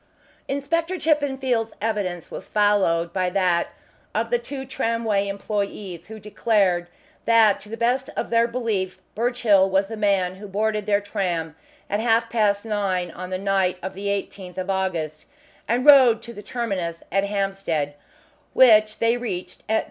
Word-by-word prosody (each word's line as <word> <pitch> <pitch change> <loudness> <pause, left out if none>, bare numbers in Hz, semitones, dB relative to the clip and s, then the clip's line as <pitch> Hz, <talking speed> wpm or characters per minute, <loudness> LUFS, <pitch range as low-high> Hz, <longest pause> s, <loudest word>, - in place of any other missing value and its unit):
Inspector 330 +6 -1
Chippenfield's 265 -8 0
evidence 200 -5 -3
was - - -8
followed 190 -5 +2
by 185 -1 0
that 180 -2 +1 0.5
of 230 +2 -1
the 240 - +3
two 265 +3 -6
tramway 230 -5 -1
employees, 200 -3 -4
who 220 +1 -9
declared 200 -4 +1 0.4
that 225 -3 +5
to 210 - -11
the 225 - -6
best 245 +3 0
of - - -3
their 230 0 +4
belief 225 -6 -2 0.2
Birchill 220 -4 +3
was 195 +1 +1
the 225 - -5
man 195 -3 +1
who 205 +1 -9
boarded 210 +1 -1
their 205 -1 +2
tram 180 -6 -2 0.3
at 205 - -1
half 230 0 +2
past 210 -2 +1
nine 190 -5 -1
on 180 +2 -7
the 185 - -2
night 195 -1 +1
of 190 - -4
the 200 +1 -5
18th 195 -2 -4
of 185 +1 -2
August, 170 -5 -2 0.4
and 245 +3 0
rode 255 -6 +7
to 235 - -9
the 205 - -9
terminus 195 -7 -3
at 195 +1 +2
Hampstead, 195 -7 -2 0.6
which 215 -4 +6
they 230 +1 +2
reached 190 -7 -5
at 220 - +2
10. - - +4
205 Hz, 160 wpm, -23 LUFS, 190-230 Hz, 0.6 s, rode